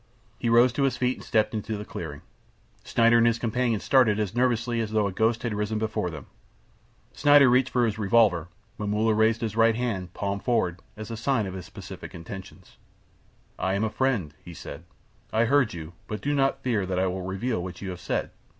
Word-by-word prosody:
He 120 - 0
rose 120 +1 +5
to 140 - -2
his 135 -2 +1
feet 125 0 0
and - - -11
stepped 110 0 +1
into 110 0 -3
the 105 - -7
clearing. 75 -7 -7 0.6
Schneider 115 0 +4
and 115 - +5
his 115 -1 +2
companion 115 -1 0
started 115 -6 +3
as 105 -2 -2
nervously 120 -1 +1
as 110 - -2
though 110 -1 +1
a 100 - -1
ghost 110 +4 +1
had 120 -3 -1
risen 105 +1 -2
before 110 -4 -1
them. 75 -5 -8 0.9
Schneider 145 -2 +6
reached 125 +1 +3
for 125 -1 +2
his 110 -1 -2
revolver. 100 -6 +3 0.3
Momulla 105 +2 +1
raised 110 +1 +2
his 110 -2 -3
right 115 0 +4
hand, 105 -7 -3
palm 100 0 -2
forward, 100 -7 0 0.2
as 110 +1 -7
a 115 - -4
sign 115 -1 0
of 95 - -5
his 95 -2 -8
pacific - - -9
intentions. 95 +3 -10 0.8
"I 95 +1 0
am 100 - 0
a 110 - -1
friend," 115 - 0
he 85 -1 -10
said. 75 +3 -9 0.5
"I 110 +1 +2
heard 130 -4 +2
you; 80 0 -8
but 105 - -4
do 145 - 0
not 135 -1 +1
fear 110 -7 0
that 90 -1 -2
I 95 - +2
will 95 0 -2
reveal 95 +4 -2
what 90 -1 -7
you 95 -2 -5
have 90 -1 -8
said. - - -2
110 Hz, 210 wpm, -26 LUFS, 95-120 Hz, 0.9 s, Schneider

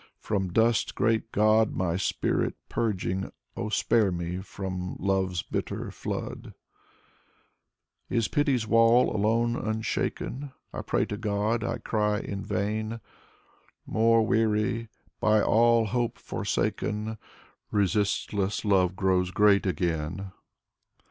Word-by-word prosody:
From 95 -4 -2
dust, 115 +3 +2
great 115 0 +1
God, 110 +1 +3
my 85 -2 0
spirit 95 - 0
purging. 95 -3 -1 0.2
Oh, 110 - -3
spare 110 -2 +2
me 85 0 -3
from 95 -2 -5
love's 95 -3 0
bitter - - -4
flood! - - -5 1.5
Is 115 -3 +1
pity's 140 -6 +1
wall 115 +2 +4
alone 115 +3 +2
unshaken? 120 +5 -3 0.2
I - - -4
pray - - 0
to 105 - -5
God, 105 +2 0
I - - -2
cry 105 -1 0
in 100 -3 -5
vain. 110 +3 -2 0.9
More 115 0 +3
weary, 110 0 +1 0.3
by 110 0 +4
all 115 0 +4
hope 120 +2 -1
forsaken; 110 +1 -2 0.5
Resistless 100 +1 0
love 95 -3 +3
grows 95 -1 +1
great 100 +1 +4
again. 90 +2 -2
105 Hz, 110 wpm, -27 LUFS, 95-115 Hz, 1.5 s, wall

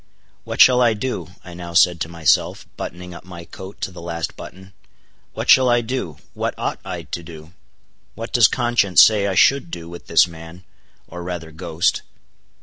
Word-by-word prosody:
What - - -6
shall 125 -1 +7
I 115 -2 +3
do? 130 +5 -4 0.2
I 90 - -11
now 85 -1 -8
said 90 -2 +4
to 80 - -2
myself, 85 -2 +1
buttoning 90 +1 -8
up - - -11
my 85 -2 -11
coat 95 +3 -11
to - - -3
the 90 - -11
last 85 -1 -5
button. 95 +1 -12 0.6
What - - -4
shall 130 -1 +6
I 120 0 +3
do? 115 - -5 0.2
what - - -3
ought - - -3
I - - -6
to 85 - -6
do? 80 0 -13 0.6
what 115 +2 -8
does 120 -4 +6
conscience 120 -7 +4
say 105 -2 +3
I 95 - -2
should 140 - +3
do 85 - -8
with 85 +1 -11
this - - +5
man, 80 +2 -12 0.4
or 90 +1 -9
rather 85 -2 -6
ghost. 80 +2 -1
90 Hz, 185 wpm, -20 LUFS, 85-110 Hz, 0.6 s, shall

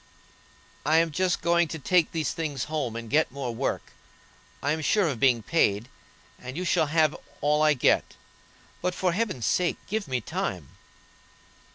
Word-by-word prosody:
"I 155 +3 +3
am 165 0 +3
just 180 +3 0
going 170 0 +3
to 160 - -5
take 170 +2 +2
these 160 -4 -1
things 150 -6 -3
home 150 -7 -3
and 115 0 -6
get 150 +7 +2
more 130 -3 -4
work. 130 +4 -3 0.7
I 145 - +1
am 160 +1 -1
sure 195 +4 +2
of 135 -7 -2
being 120 -4 +3
paid, 110 -5 +1 0.5
and 130 +3 -8
you 180 - -2
shall 165 -3 +2
have 155 0 +2 0.2
all 150 +1 +2
I 155 -1 +4
get. 125 - +2 0.7
But, 180 0 -1
for 185 -1 +1
Heaven's 185 - -1
sake, 180 -1 +1
give 215 -2 -2
me 130 -2 -1
time." 110 - -4
155 Hz, 170 wpm, -26 LUFS, 130-170 Hz, 0.7 s, I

